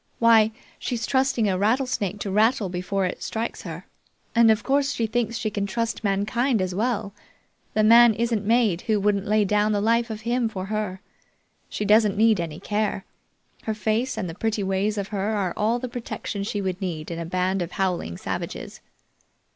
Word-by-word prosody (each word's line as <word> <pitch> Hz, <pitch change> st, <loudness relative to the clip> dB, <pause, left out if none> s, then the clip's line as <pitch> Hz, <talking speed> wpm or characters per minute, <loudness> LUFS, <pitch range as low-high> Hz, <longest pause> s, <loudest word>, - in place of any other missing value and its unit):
"Why, 225 Hz, -2 st, +5 dB, 0.3 s
she's 230 Hz, -2 st, -2 dB
trusting 260 Hz, -4 st, +1 dB
a 185 Hz, -2 st, 0 dB
rattlesnake 215 Hz, -3 st, 0 dB
to 195 Hz, -, -3 dB
rattle 215 Hz, 0 st, +2 dB
before 185 Hz, +2 st, -1 dB
it 180 Hz, -, -4 dB
strikes 225 Hz, +1 st, -4 dB
her, -, -, -8 dB, 0.5 s
and 235 Hz, -1 st, +5 dB
of 220 Hz, 0 st, +3 dB
course, 280 Hz, +1 st, +1 dB
she 230 Hz, -, -1 dB
thinks 230 Hz, 0 st, -1 dB
she 215 Hz, -2 st, -2 dB
can 200 Hz, -1 st, -2 dB
trust 230 Hz, +3 st, -2 dB
mankind 215 Hz, +5 st, +1 dB
as 185 Hz, -1 st, -1 dB
well. 210 Hz, -1 st, -1 dB, 0.6 s
The 215 Hz, -, +3 dB
man 230 Hz, +1 st, +7 dB
isn't 230 Hz, -2 st, 0 dB
made 220 Hz, -5 st, +2 dB
who 215 Hz, -1 st, +3 dB
wouldn't 200 Hz, 0 st, 0 dB
lay 210 Hz, 0 st, +3 dB
down 210 Hz, +2 st, +2 dB
the 205 Hz, -, +1 dB
life 230 Hz, +3 st, +2 dB
of 215 Hz, -1 st, -5 dB
him 235 Hz, +1 st, 0 dB
for 190 Hz, -3 st, -5 dB
her. 205 Hz, -3 st, -3 dB, 0.7 s
She 210 Hz, -, -3 dB
doesn't 210 Hz, -1 st, +4 dB
need 220 Hz, -2 st, +4 dB
any 165 Hz, -2 st, -4 dB
care. 205 Hz, 0 st, -2 dB, 0.6 s
Her 220 Hz, -, -1 dB
face 220 Hz, +4 st, -1 dB
and 185 Hz, -, -2 dB
the 165 Hz, -, -6 dB
pretty 215 Hz, +2 st, -1 dB
ways 195 Hz, +2 st, 0 dB
of 200 Hz, -1 st, -3 dB
her 205 Hz, +1 st, -1 dB
are 190 Hz, -4 st, -1 dB
all 220 Hz, +3 st, +1 dB
the 255 Hz, +1 st, -4 dB
protection 235 Hz, -4 st, -5 dB
she 205 Hz, 0 st, -2 dB
would 185 Hz, 0 st, -3 dB
need 170 Hz, -4 st, -4 dB
in 165 Hz, -, -4 dB
a -, -, -3 dB
band 185 Hz, +2 st, 0 dB
of 175 Hz, +1 st, -4 dB
howling 180 Hz, -, -1 dB
savages." -, -, -5 dB
210 Hz, 190 wpm, -24 LUFS, 195-230 Hz, 0.7 s, man